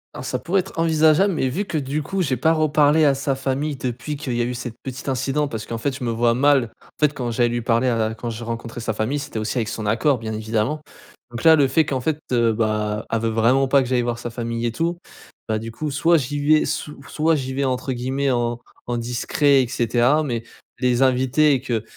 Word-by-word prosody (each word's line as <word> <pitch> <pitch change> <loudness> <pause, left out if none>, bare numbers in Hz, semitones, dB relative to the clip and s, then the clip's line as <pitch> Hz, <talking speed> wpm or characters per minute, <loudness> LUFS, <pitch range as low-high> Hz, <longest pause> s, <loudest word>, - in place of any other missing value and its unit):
Hein, - - -6
ça - - -2
pourrait 185 +3 +1
être 185 -2 -9
envisageable, 160 +4 +4
mais 130 - 0
vu 195 +11 -2
que 165 - -3
du 145 +1 -2
coup, 190 +5 -2
j'ai 130 -4 0
pas 160 +7 +2
reparlé 155 0 +3
à 140 - +5
sa 135 0 -1
famille 140 +3 -2
depuis 130 +4 -4
qu'il 140 -4 -4
y 120 - 0
a - - +2
eu 125 +1 -3
cette 120 -2 -5
petite 130 +1 -7
incident 135 +3 0
parce 110 -5 -6
qu'en 115 - -4
fait, 130 +4 -2
je 130 - -7
me 120 - -1
vois 115 +1 +2
mal, 130 -2 +3
en - - -21
fait, 150 -1 +3
quand 125 -4 -3
j'aille 120 +1 +1
lui 120 0 -2
parler 115 +2 +1
à 120 - +1
la 110 0 -1
quand 120 0 -5
j'ai 115 +1 -7
rencontré 115 0 -5
sa 110 -1 -2
famille, 110 +7 -1
c'était 125 - -6
aussi, 110 +4 -1
avec 110 - -1
son 110 - -5
accord, 125 +6 +2
bien 110 -1 -5
évidemment, 110 +7 -1 0.5
donc 120 -1 -7
là, 160 -1 +8
le 140 -3 +3
fait 155 +4 +2
qu'en 135 -3 -2
fait, 155 +3 -1
heu, 115 -2 +3
bah, 105 -1 -1
elle 115 - +1
veut 115 - 0
vraiment 120 +5 +3
pas 135 0 +4
que 125 - -5
j'aille 125 -1 +2
voir 120 -1 -2
sa 120 - -6
famille 115 0 -3
et 120 - 0
tout, 170 +7 -1 0.5
bah, 110 -1 0
du 115 +1 -7
coup, 150 +6 -4
soit 165 +4 +3
j'y 145 +1 -3
vais 150 +2 +3
sou 150 -1 -4
soit 160 +1 +1
j'y 130 -2 -3
vais 140 +1 -1
entre 130 0 -1
guillemets 130 +3 -1
«en 120 -1 0 0.3
en 120 - -1
discret» 130 +4 +2
et 125 - -4
cetera, 125 +5 +2
mais 120 -5 -3 0.4
les 125 -1 +1
inviter 130 +3 +3
et 130 - 0
qu'ils 120 -5 -2
130 Hz, 250 wpm, -22 LUFS, 115-145 Hz, 0.5 s, là